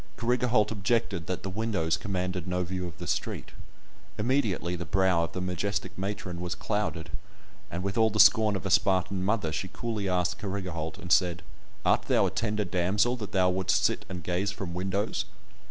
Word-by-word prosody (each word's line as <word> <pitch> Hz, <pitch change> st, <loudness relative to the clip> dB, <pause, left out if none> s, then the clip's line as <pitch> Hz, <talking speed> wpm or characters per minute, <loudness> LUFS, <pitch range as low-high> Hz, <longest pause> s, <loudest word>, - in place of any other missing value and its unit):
Carrigaholt 120 Hz, -2 st, +2 dB
objected 100 Hz, -5 st, 0 dB
that 90 Hz, -, -3 dB
the 95 Hz, -, -3 dB
windows 95 Hz, -6 st, 0 dB
commanded 90 Hz, -2 st, -3 dB
no 90 Hz, 0 st, 0 dB
view 90 Hz, 0 st, -3 dB
of 80 Hz, -4 st, -10 dB
the -, -, -6 dB
street. -, -, -2 dB, 0.7 s
Immediately 105 Hz, -7 st, +1 dB
the 85 Hz, -, -4 dB
brow 95 Hz, 0 st, +2 dB
of -, -, -10 dB
the 90 Hz, -, -3 dB
majestic 90 Hz, 0 st, -2 dB
matron 95 Hz, -2 st, -4 dB
was 90 Hz, -1 st, -2 dB
clouded, 100 Hz, -7 st, -2 dB, 0.6 s
and 85 Hz, +1 st, -4 dB
with 100 Hz, +3 st, -1 dB
all 110 Hz, 0 st, +5 dB
the 110 Hz, 0 st, -2 dB
scorn 110 Hz, -2 st, +7 dB
of 95 Hz, -, -4 dB
a 100 Hz, -, -1 dB
Spartan 95 Hz, 0 st, +2 dB
mother 100 Hz, -5 st, +1 dB
she 85 Hz, +5 st, -2 dB
coolly 110 Hz, -2 st, -3 dB
asked 90 Hz, -1 st, 0 dB
Carrigaholt, 90 Hz, -5 st, -4 dB
and 90 Hz, -4 st, -7 dB
said, 85 Hz, -1 st, +3 dB, 0.4 s
"Art -, -, +4 dB
thou -, -, +4 dB
a -, -, 0 dB
tender 105 Hz, -2 st, -1 dB
damsel 95 Hz, +7 st, +2 dB
that 105 Hz, -3 st, -6 dB
thou 95 Hz, -2 st, +3 dB
wouldst 95 Hz, 0 st, +2 dB
sit -, -, +1 dB
and 90 Hz, -2 st, -6 dB
gaze 90 Hz, +4 st, 0 dB
from 95 Hz, -3 st, -5 dB
windows?" 100 Hz, +3 st, -1 dB
95 Hz, 185 wpm, -28 LUFS, 90-105 Hz, 0.7 s, scorn